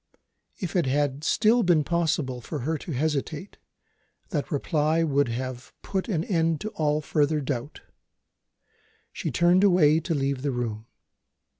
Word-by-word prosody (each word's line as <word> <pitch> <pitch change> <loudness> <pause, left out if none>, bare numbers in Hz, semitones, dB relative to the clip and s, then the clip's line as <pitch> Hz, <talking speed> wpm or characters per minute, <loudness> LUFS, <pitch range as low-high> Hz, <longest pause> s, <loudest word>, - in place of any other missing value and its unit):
If 185 -6 -5
it 175 -6 +2
had 145 +1 0
still 220 +7 +3
been 175 -6 +3
possible 155 -6 -1
for 145 +4 -5
her 160 +6 -1
to 165 +3 -6
hesitate, 150 +5 -2 0.7
that 145 -3 -2
reply 155 +2 +1
would 145 -3 +2
have 130 +1 -5
put 190 +2 -3
an 165 -6 0
end 165 -5 +1
to 215 - -3
all 150 -5 0
further 150 0 +1
doubt. 140 0 -4 1.3
She - - -3
turned 175 +2 +3
away 165 -6 +5
to 165 0 -2
leave 135 -2 -1
the 145 - -1
room. 115 -3 -4
150 Hz, 145 wpm, -26 LUFS, 140-170 Hz, 1.3 s, away